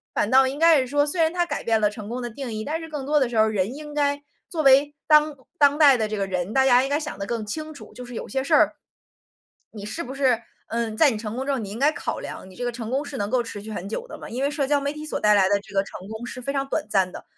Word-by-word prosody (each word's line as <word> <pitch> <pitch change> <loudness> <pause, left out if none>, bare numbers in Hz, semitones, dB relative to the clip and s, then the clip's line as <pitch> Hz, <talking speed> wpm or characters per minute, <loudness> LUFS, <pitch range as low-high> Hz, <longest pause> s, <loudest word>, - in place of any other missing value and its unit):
反 205 - 0
倒 265 0 +6
应 270 +2 -4
该 325 -1 +6
是 255 - -1
说， 290 +2 +2
虽 315 +3 -1
然 320 0 +3
它 350 0 0
改 - - -4
变 225 -1 +2
了 210 - +3
成 210 -1 -8
功 245 +2 -4
的 240 -1 -5
定 255 +1 -6
义， 215 0 -4
但 315 +2 -2
是 325 - -8
更 295 -4 -5
多 300 +1 +3
的 260 -4 +1
时 235 - -3
候 215 - +6
儿， 220 - +1
人 205 +4 -1
应 295 0 -9
该 285 -1 0 0.3
作 325 -3 -2
为 280 +2 +5
当 300 -1 +4 0.2
当 285 0 +5
代 290 -4 +7
的 220 -3 0
这 215 0 -4
个 200 - 0
人， 185 0 -3
大 265 +3 +3
家 250 -1 +5
应 270 - -2
该 290 +1 +1
想 300 -10 -6
得 195 - -4
更 230 -1 -3
清 310 +8 -5
楚， 240 -8 -12
就 250 - -9
是 245 0 -9
有 - - -5
些 265 0 -2
事 275 - +3
儿， - - +4 1.0
你 205 -2 -8
是 320 +11 -4
不 265 +2 -7
是， 260 -4 +2 0.3
嗯， 230 -1 -2
在 305 - +6
你 220 - -3
成 215 0 -5
功 260 +2 -3
之 280 - 0
后 270 - 0
你 210 -3 -5
应 205 - -6
该 290 +3 +4
考 - - -4
量， 185 - -8
你 185 - -15
这 245 - -6
个 245 - -1
成 230 -2 -6
功 270 +3 0
是 285 - -7
能 205 -2 -2
够 250 0 +1
持 205 -3 -7
续 215 - -9
很 195 -2 -5
久 475 - -5
的 - - -9
吗？ - - -9
因 245 +3 -4
为 280 - +2
社 290 -2 -1
交 290 0 +3
媒 280 0 -1
体 300 0 -8
所 310 - -3
带 210 0 +4
来 195 -2 +4
的 200 - +3
这 205 - -15
个 195 - +3
成 190 -1 -10
功 220 +2 -6
是 250 +1 -7
非 275 - -3
常 275 -1 -1
短 305 - -2
暂 190 -3 +2
的， - - -9
255 Hz, 350 characters per minute, -24 LUFS, 215-290 Hz, 1.0 s, 代